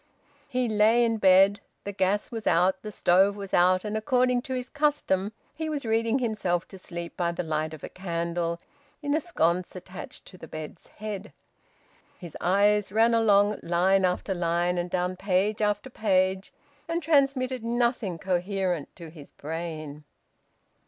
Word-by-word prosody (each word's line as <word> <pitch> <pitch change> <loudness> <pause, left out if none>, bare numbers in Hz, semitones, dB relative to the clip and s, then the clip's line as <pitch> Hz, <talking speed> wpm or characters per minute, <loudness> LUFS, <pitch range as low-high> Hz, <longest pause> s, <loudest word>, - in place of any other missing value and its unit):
He 250 -1 -1
lay 220 +2 +4
in 225 -1 0
bed. 195 +1 +5 0.2
The 200 - -4
gas 195 +1 0
was 225 -2 -5
out, 180 +3 +3
the 215 - -7
stove 195 +2 +3
was 195 -1 -8
out, 185 +2 +4
and 210 0 -3
according 250 +3 +2
to 260 +1 -5
his 250 0 -4
custom 285 -10 0 0.2
he 320 -1 -4
was 290 -4 -3
reading 225 +2 +1
himself 210 -8 -1
to 190 - -11
sleep 170 -1 -7
by 170 -1 0
the 170 - -4
light 155 -1 -2
of 155 -2 -10
a - - -4
candle 170 -1 -3 0.4
in 285 0 0
a 310 - +3
sconce 180 - 0
attached 185 0 -9
to 185 - -14
the 160 - -10
bed's 155 +1 -9
head. 210 -1 -7 0.8
His 175 -3 -10
eyes 200 +2 +3
ran 225 +3 +3
along 210 -2 +3
line 185 +3 +2
after 185 +2 0
line 175 0 0
and 175 0 -3
down 180 0 -1
page 200 +3 0
after 210 +4 -1
page, 190 -3 +1 0.4
and 335 0 -2
transmitted 275 -5 +1
nothing 235 -6 0
coherent 180 -2 -2
to 165 -3 -10
his 150 -4 -12
brain. 155 -1 -6
195 Hz, 160 wpm, -27 LUFS, 175-225 Hz, 0.8 s, bed